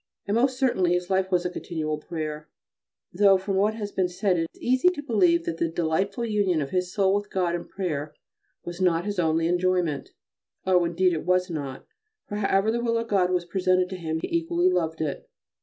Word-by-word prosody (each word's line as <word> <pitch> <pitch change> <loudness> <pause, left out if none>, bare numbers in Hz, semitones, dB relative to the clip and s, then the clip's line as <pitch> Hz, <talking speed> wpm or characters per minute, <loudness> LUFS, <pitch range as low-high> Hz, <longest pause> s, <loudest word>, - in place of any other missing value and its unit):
And 200 - -2
most 255 +3 +2
certainly 190 -10 +2
his 180 +1 -2
life 190 0 +1
was 180 -1 +1
a - - +1
continual 155 -4 -3
prayer. 155 -1 -5 0.6
Though, 195 +1 +5
from 190 +1 -3
what 210 +3 +2
has 205 -2 -5
been 185 -2 0
said, 185 +1 0
it 170 - 0
is - - -22
easy 255 +7 +3
to 345 -5 -5
believe 180 - +3
that 165 -1 -3
the 165 - +1
delightful 175 +7 -1
union 205 -6 +1
of 140 -2 -3
his 180 -1 -1
soul 195 -1 +2
with 205 0 -1
God 180 -2 0
in 175 - -4
prayer 155 -6 -4 0.5
was 175 +1 -6
not 175 -1 +2
his 205 -2 -3
only 165 -1 +2
enjoyment. 175 -4 0 0.6
Oh! 180 -2 +3
indeed 180 +2 +2
it 160 - -3
was 180 0 +1
not, 140 -4 -5 0.4
for 205 - -4
however 200 +1 +2
the 235 +1 -1
will 230 -1 +1
of 230 0 -3
God 185 -3 +2
was 180 -1 0
presented 185 0 +1
to - - -3
him 160 -3 -3
he - - -3
equally 170 +2 +2
loved 160 -3 -1
it. 150 -3 -4
180 Hz, 210 wpm, -25 LUFS, 170-200 Hz, 0.6 s, Though